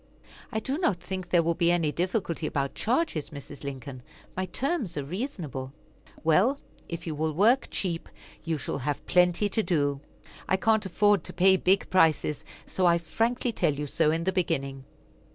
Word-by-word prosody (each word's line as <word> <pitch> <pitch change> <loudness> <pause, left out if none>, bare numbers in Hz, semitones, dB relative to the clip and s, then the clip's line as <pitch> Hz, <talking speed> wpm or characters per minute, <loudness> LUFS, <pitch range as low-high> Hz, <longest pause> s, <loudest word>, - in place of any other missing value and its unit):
"I 220 - -1
do 270 +7 -3
not 200 - +1
think 185 0 -5
there 175 -2 +4
will 170 +1 +1
be 170 0 +2
any 165 -4 +2
difficulty 175 -2 -1
about 140 -2 -1
charges, 240 - 0
Mrs. 140 -1 -10
Lincoln; 135 -2 -6 0.3
my 185 0 -2
terms 250 - -2
are 145 - -1
reasonable." 150 - -5 0.5
"Well, 190 - +4 0.3
if 170 -1 -5
you 160 - -3
will 155 +1 -1
work 225 - +4
cheap, 170 -4 -3 0.3
you 165 -2 -1
shall 140 - -4
have 145 +2 -3
plenty 180 +3 +3
to 220 - +1
do. 145 -8 0 0.5
I 190 - +3
can't 220 -1 +2
afford 205 0 +3
to - - -6
pay 190 +1 +5
big 190 +1 +2
prices, 160 -4 +3 0.2
so 185 -1 +1
I 170 0 +5
frankly 230 +9 -1
tell 170 -9 +1
you 150 +1 -3
so 150 +2 +1
in 165 +2 0
the 190 +2 0
beginning." 140 -7 -1
170 Hz, 175 wpm, -27 LUFS, 150-195 Hz, 0.5 s, pay